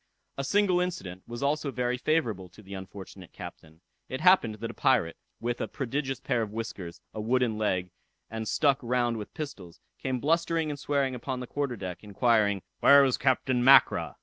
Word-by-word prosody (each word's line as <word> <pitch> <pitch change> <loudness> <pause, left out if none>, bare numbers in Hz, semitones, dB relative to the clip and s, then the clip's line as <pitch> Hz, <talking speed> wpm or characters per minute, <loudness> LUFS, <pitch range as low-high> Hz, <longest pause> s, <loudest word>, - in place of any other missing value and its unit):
A 135 - -3
single 195 +3 +2
incident 100 - -4
was 120 +2 -6
also 145 +1 0
very 125 -1 -1
favorable 120 - -1
to 105 +5 -16
the 100 0 -10
unfortunate 95 -1 -9
captain. 80 +1 -11 0.3
It 130 - -4
happened 175 - +4
that 115 +2 -5
a - - -14
pirate, 115 -11 +2 0.2
with 120 +1 -3
a - - -1
prodigious 135 0 -3
pair 125 -4 0
of 110 - -2
whiskers, 105 -6 -6
a 110 - -4
wooden 120 0 +1
leg, 90 -4 -1 0.4
and 110 0 -5
stuck 140 +2 +2
round 120 -1 0
with 105 - -8
pistols, 90 - -7 0.2
came 130 -2 -2
blustering 165 +1 +1
and 145 - -6
swearing 140 -2 0
upon 125 +1 -4
the 125 - -5
quarter 140 0 -2
deck, 90 -3 -7
inquiring 105 -2 +2 0.2
"where 140 0 +7
was 130 -2 +1
Captain 130 -1 +1
Mackra." 135 +2 +5
120 Hz, 180 wpm, -28 LUFS, 105-140 Hz, 0.4 s, where